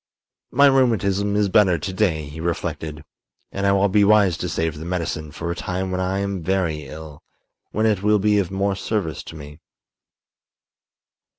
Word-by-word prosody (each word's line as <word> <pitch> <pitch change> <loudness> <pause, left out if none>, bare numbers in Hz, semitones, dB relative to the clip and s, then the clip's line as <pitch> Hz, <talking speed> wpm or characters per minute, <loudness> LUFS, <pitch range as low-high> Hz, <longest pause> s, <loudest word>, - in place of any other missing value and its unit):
"My 140 +3 +4
rheumatism 105 -7 +2
is 105 -1 +2
better 95 -3 +4
to 90 +5 -5
day," 95 -6 +1
he 75 +2 -9
reflected, 80 -2 -4 0.5
"and 100 0 -1
I - - +4
will 100 +1 +3
be 100 +1 +3
wise 100 -3 +4
to - - -3
save 80 -2 -2
the - - -7
medicine 85 -3 -3
for 85 +3 -4
a - - -3
time 95 +1 -3
when 90 0 -1
I 95 +1 -1
am 100 -2 -2
very 80 -5 -1
ill, 75 0 -10 0.5
when 110 +2 0
it 105 -4 +2
will 105 +1 +3
be 105 +1 +2
of 95 -4 -1
more 100 +1 -1
service 95 -5 -3
to - - -11
me." 75 0 -11
95 Hz, 180 wpm, -22 LUFS, 80-100 Hz, 0.5 s, My